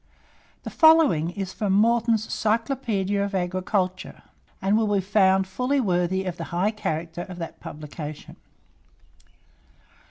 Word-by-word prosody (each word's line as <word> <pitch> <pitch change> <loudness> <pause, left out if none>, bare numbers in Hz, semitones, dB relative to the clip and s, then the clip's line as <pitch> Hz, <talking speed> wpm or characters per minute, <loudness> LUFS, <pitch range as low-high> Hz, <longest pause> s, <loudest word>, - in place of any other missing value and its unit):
The - - -6
following 315 - +5
is 190 0 -5
from 205 -3 -1
Morton's 225 +1 +2
"Cyclopaedia 220 -4 0
of 200 0 -3
Agriculture," 185 +1 -2 0.4
and 195 +1 +1
will 220 0 +2
be 200 - +2
found 190 -1 +3
fully 250 +9 -1
worthy 190 -3 0
of 180 -2 -4
the 165 - -5
high 180 +6 0
character 170 -5 -4
of 180 - -8
that 165 -2 -7
publication. 150 0 -8
190 Hz, 125 wpm, -24 LUFS, 180-220 Hz, 0.4 s, following